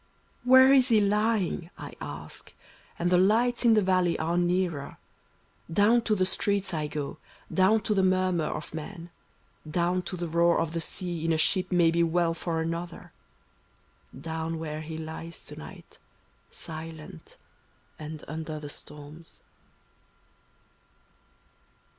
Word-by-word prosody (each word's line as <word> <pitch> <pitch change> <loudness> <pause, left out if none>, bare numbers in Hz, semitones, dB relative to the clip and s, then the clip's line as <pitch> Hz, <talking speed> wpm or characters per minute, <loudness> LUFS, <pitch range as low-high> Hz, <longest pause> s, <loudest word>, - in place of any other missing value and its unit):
"Where 260 +2 +7
is 260 -1 +5
he 225 -2 +5
lying?" 205 -4 +1
I - - -8
ask, 75 +1 -8 0.4
and 175 +1 0
the 180 - +5
lights 230 +6 +3
in 230 -1 +6
the 215 - +4
valley 185 -2 +2
are 165 +2 -1
nearer; 175 -4 0 0.7
Down 210 +7 +4
to 215 - +2
the 185 -2 +2
streets 200 0 -1
I 155 -2 -1
go, 150 0 -5 0.3
down 195 +4 +4
to 210 - 0
the 195 - +3
murmur 185 -3 +2
of - - -5
men. 170 +2 -7 0.6
Down 175 +3 +1
to 185 - -6
the 175 0 -3
roar 170 +1 +3
of 165 -1 -1
the 165 0 -2
sea 175 -1 -3
in 165 - +1
a 160 - +2
ship 180 +3 +1
may 170 -2 +4
be 170 0 +2
well 170 0 +2
for 165 -1 -2
another 170 +1 -5 0.5
— - - -20
Down 160 0 -3
where 155 -1 -5
he 160 0 -6
lies 160 +1 -7
to - - -9
night, - - -12 0.5
silent, 160 - -9 0.6
and 155 0 -7
imder 155 0 -5
the 145 -1 -7
storms. 150 +3 -10
170 Hz, 145 wpm, -28 LUFS, 160-190 Hz, 0.7 s, Where